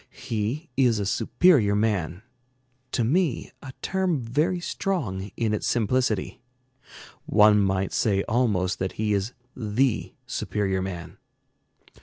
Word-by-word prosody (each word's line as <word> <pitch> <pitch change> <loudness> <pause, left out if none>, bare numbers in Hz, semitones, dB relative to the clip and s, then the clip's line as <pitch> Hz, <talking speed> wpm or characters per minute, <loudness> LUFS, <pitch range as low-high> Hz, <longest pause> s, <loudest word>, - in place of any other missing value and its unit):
He 120 +9 -2
is 125 -4 +3
a 100 - -1
superior 115 - +3
man, 100 -4 0 0.7
to 120 - +1
me 150 +2 0
a 135 - -8
term 185 -5 0
very 150 +10 0
strong 120 - -2
in 110 -2 0
its 105 - -1
simplicity; 120 -2 0 0.9
one 105 -1 +6
might 95 -1 0
say 100 -3 +1
almost 105 -6 0
that 95 0 -2
he 105 -1 0
is 100 +4 -1 0.2
the 120 +2 0
superior 95 -2 -1
man. 90 -3 -6
110 Hz, 120 wpm, -25 LUFS, 100-130 Hz, 0.9 s, one